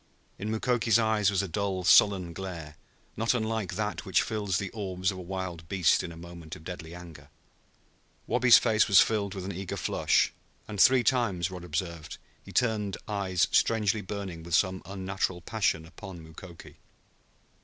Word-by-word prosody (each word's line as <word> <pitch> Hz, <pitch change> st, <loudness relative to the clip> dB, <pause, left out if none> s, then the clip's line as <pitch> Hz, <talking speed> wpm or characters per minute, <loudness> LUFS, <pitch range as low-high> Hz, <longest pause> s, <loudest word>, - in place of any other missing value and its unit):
In 105 Hz, -, -4 dB
Mukoki's 115 Hz, 0 st, +2 dB
eyes 110 Hz, -3 st, +2 dB
was 100 Hz, -1 st, +1 dB
a -, -, -3 dB
dull 95 Hz, +1 st, -2 dB
sullen 95 Hz, -1 st, +5 dB
glare, 85 Hz, -5 st, -7 dB, 0.4 s
not 115 Hz, +3 st, +1 dB
unlike 110 Hz, -5 st, -2 dB
that 105 Hz, -4 st, -3 dB
which 95 Hz, -3 st, +2 dB
fills 105 Hz, -5 st, -1 dB
the 95 Hz, 0 st, -4 dB
orbs 95 Hz, -3 st, -2 dB
of 95 Hz, -, -8 dB
a -, -, -6 dB
wild 90 Hz, -3 st, -6 dB
beast 95 Hz, -4 st, +3 dB
in 85 Hz, -, -6 dB
a 80 Hz, -, -11 dB
moment 85 Hz, -1 st, -9 dB
of 80 Hz, -, -13 dB
deadly 85 Hz, -1 st, -8 dB
anger. 80 Hz, -5 st, -12 dB, 1.0 s
Wabi's 125 Hz, 0 st, +6 dB
face 110 Hz, -2 st, +3 dB
was 100 Hz, -, +7 dB
filled 100 Hz, -3 st, +1 dB
with 95 Hz, -2 st, -5 dB
an 100 Hz, -, -3 dB
eager 95 Hz, +1 st, -5 dB
flush, -, -, +1 dB, 0.3 s
and 105 Hz, -2 st, -1 dB
three 130 Hz, 0 st, +6 dB
times, 100 Hz, -10 st, +1 dB
Rod 90 Hz, -2 st, -8 dB
observed, 85 Hz, -1 st, -4 dB, 0.3 s
he -, -, -12 dB
turned 110 Hz, -5 st, 0 dB
eyes 95 Hz, -4 st, 0 dB
strangely 110 Hz, -2 st, +2 dB
burning 95 Hz, -4 st, -6 dB
with 85 Hz, 0 st, -1 dB
some 95 Hz, 0 st, +1 dB
unnatural 95 Hz, -1 st, -3 dB
passion 90 Hz, -4 st, -1 dB
upon 90 Hz, +2 st, -10 dB
Mukoki. 85 Hz, +2 st, -12 dB
95 Hz, 165 wpm, -28 LUFS, 85-105 Hz, 1.0 s, was